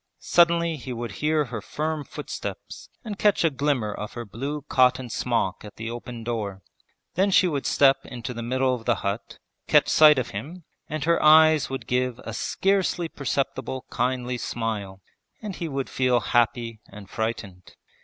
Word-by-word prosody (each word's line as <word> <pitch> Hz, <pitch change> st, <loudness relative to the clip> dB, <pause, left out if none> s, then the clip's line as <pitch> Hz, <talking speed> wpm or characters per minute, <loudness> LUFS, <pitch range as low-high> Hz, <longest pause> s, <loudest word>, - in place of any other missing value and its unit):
Suddenly 170 Hz, -1 st, +3 dB
he 130 Hz, -1 st, -7 dB
would 120 Hz, 0 st, -5 dB
hear 150 Hz, 0 st, +2 dB
her 115 Hz, -3 st, -6 dB
firm 155 Hz, +5 st, -3 dB
footsteps -, -, -7 dB, 0.2 s
and 205 Hz, -3 st, -6 dB
catch 205 Hz, -4 st, +3 dB
a 165 Hz, -, +3 dB
glimmer 135 Hz, -6 st, 0 dB
of 105 Hz, 0 st, -6 dB
her 120 Hz, -1 st, -6 dB
blue 140 Hz, +8 st, -5 dB
cotton 130 Hz, -3 st, +2 dB
smock 115 Hz, -7 st, -1 dB
at 105 Hz, -, -11 dB
the 115 Hz, +1 st, -5 dB
open 120 Hz, -1 st, -7 dB
door. 105 Hz, -5 st, -4 dB, 0.5 s
Then 195 Hz, +3 st, +2 dB
she 185 Hz, -1 st, +5 dB
would 145 Hz, -5 st, -2 dB
step 135 Hz, -1 st, +4 dB
into 125 Hz, 0 st, -6 dB
the 115 Hz, -, -6 dB
middle 130 Hz, +2 st, +1 dB
of 115 Hz, -3 st, -5 dB
the 120 Hz, -, +3 dB
hut, 100 Hz, +2 st, -3 dB, 0.3 s
catch -, -, +4 dB
sight 155 Hz, -2 st, +7 dB
of 130 Hz, -, -2 dB
him, 155 Hz, -, -7 dB, 0.3 s
and 155 Hz, -1 st, -3 dB
her 170 Hz, +1 st, +2 dB
eyes 155 Hz, 0 st, +6 dB
would 135 Hz, 0 st, -5 dB
give 125 Hz, -1 st, 0 dB
a 115 Hz, -, -6 dB
scarcely 185 Hz, -, 0 dB
perceptible 135 Hz, -2 st, -3 dB
kindly 125 Hz, 0 st, -1 dB
smile, 105 Hz, -6 st, -4 dB, 0.4 s
and 210 Hz, -4 st, -6 dB
he 170 Hz, -, -3 dB
would 135 Hz, -3 st, -3 dB
feel 125 Hz, -2 st, +2 dB
happy 120 Hz, -1 st, 0 dB
and 100 Hz, 0 st, -11 dB
frightened. 100 Hz, -4 st, -5 dB
125 Hz, 170 wpm, -25 LUFS, 115-155 Hz, 0.5 s, sight